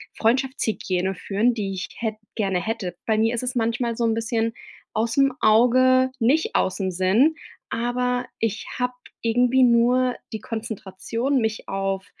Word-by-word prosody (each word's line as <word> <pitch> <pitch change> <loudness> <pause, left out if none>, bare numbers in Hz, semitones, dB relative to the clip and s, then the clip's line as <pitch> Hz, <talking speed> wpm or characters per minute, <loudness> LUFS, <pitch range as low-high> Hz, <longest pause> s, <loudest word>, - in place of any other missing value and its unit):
Freundschaftshygiene 220 -7 0
führen, 210 +7 +1
die 200 -3 -3
ich 185 0 -4
hätt 220 -2 -2 0.2
gerne 195 -5 0
hätte. 195 -5 -3
Bei 220 -1 +2
mir 225 +2 +2
ist 235 - -2
es 250 +1 -3
manchmal 230 0 0
so 235 - 0
'n 225 - +2
bisschen 225 0 -1 0.4
ausm 235 +5 +2
Auge, 255 +4 +5
nicht 270 +8 +2
ausm 190 0 0
Sinn, 195 - +3 0.4
aber 245 +1 -1
ich 225 -1 -2
habe 250 0 0 0.3
irgendwie 245 +3 +3
nur 245 +1 +4 0.2
die 220 - -4
Konzentration, 225 +4 -3
mich 220 -1 -2
auf 195 0 -2
230 Hz, 145 wpm, -23 LUFS, 210-250 Hz, 0.4 s, Auge